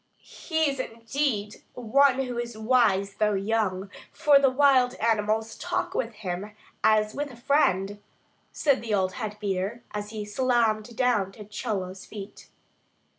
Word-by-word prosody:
"He 320 -2 -1
is 275 -2 -2
indeed 230 -2 -2 0.2
one 270 +3 +3
who 245 -2 -4
is 235 -2 -5
wise 215 -4 +2
though 210 -1 +2
young; 195 -2 -1 0.2
for 290 -2 +5
the 275 -1 +4
wild 255 -2 +4
animals 220 0 0
talk - - -2
with - - -1
him 200 +2 -5 0.3
as 215 -1 +3
with 290 0 -3
a 250 - -11
friend," 205 -7 +1 0.5
said 280 -3 +1
the 225 -3 -1
old 185 -1 0
head 215 -4 -5
beater, 200 +3 -2
as 210 0 -5
he 215 -1 -5
salaamed 230 -1 +1
down 220 -6 +1
to 210 0 -11
Chola's 195 -3 -4
feet. 205 -1 -10
220 Hz, 145 wpm, -26 LUFS, 205-255 Hz, 0.5 s, for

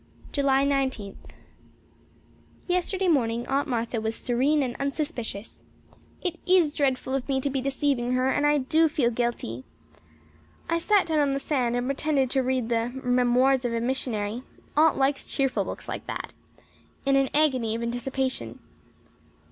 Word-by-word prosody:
July 275 -1 +2
Nineteenth. 265 -8 -2 1.4
Yesterday 365 +1 0
morning 240 -7 +1
Aunt 280 +3 0
Martha 235 -2 -1
was 220 +1 -2
serene 270 +6 +1
and 245 -2 -3
unsuspicious. 275 -7 -4 0.6
It 350 -2 -2
is 355 -5 +4
dreadful 265 -2 0
of 270 0 -2
me 265 -1 +2
to 275 +1 -1
be 265 -1 -1
deceiving 270 -2 0
her 255 +1 +2
and 290 +2 +2
I 295 0 +4
do 315 +4 +3
feel 255 -5 +1
guilty. 230 - -2 1.0
I 335 0 +1
sat 410 +3 +3
down 315 -2 +1
on 285 -2 +2
the 275 - -1
sand 255 -4 0
and 245 0 -1
pretended 275 -2 +1
to 270 - +3
read 255 -2 -1
the 230 0 +1
"Memoirs 250 +1 +3
of 235 -1 -1
a - - 0
Missionary" 235 -3 -2 0.3
Aunt 310 +1 +4
likes 275 +1 +1
cheerful 270 -2 0
books - - -7
like - - -5
that - - -5 0.7
in 275 0 +3
an 275 -1 +3
agony 260 -7 +2
of 230 - -3
anticipation. 260 +2 -2
265 Hz, 155 wpm, -26 LUFS, 240-285 Hz, 1.4 s, is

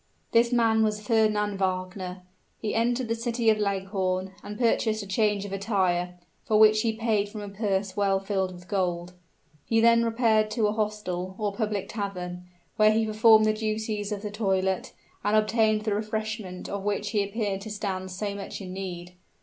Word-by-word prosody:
This 235 +1 +4
man 225 -2 +3
was 215 -1 +1
Fernand 210 -3 +2
Wagner. 185 -1 -3 0.4
He 215 - -2
entered 240 +2 +1
the 230 - 0
city 230 0 +1
of 215 - 0
Leghorn, 190 -2 -1
and 210 0 -7
purchased 220 -2 +1
a - - -9
change 205 0 +1
of 200 - -6
attire, 185 -3 0 0.3
for 215 - +2
which 215 0 +6
he 225 - +1
paid 215 -3 +1
from 210 0 -7
a 205 - -6
purse 195 -2 -1
well 200 -2 +2
filled 190 -1 -1
with 180 0 -12
gold. 180 -3 -1 0.5
He 225 - +3
then 230 0 +5
repaired 225 -2 +2
to 220 -1 +1
a 210 - +2
hostel, 205 -4 -3
or 210 -2 -1
public 210 -2 -2
tavern, 180 -4 -5 0.3
where 215 0 +6
he 220 +1 +2
performed 215 0 +5
the 215 - +3
duties 215 -1 -2
of 205 0 -4
the 210 - -4
toilet, 190 -3 0 0.3
and 210 +1 +3
obtained 215 0 +2
the 215 -1 0
refreshment 215 -3 -4
of 200 - -4
which 205 0 -1
he 210 -2 +2
appeared 200 -1 -2
to 215 - -7
stand 195 -3 -3
so 200 +2 -3
much 200 -1 -6
in 185 -2 -7
need. 180 -2 -6
210 Hz, 180 wpm, -27 LUFS, 190-220 Hz, 0.5 s, which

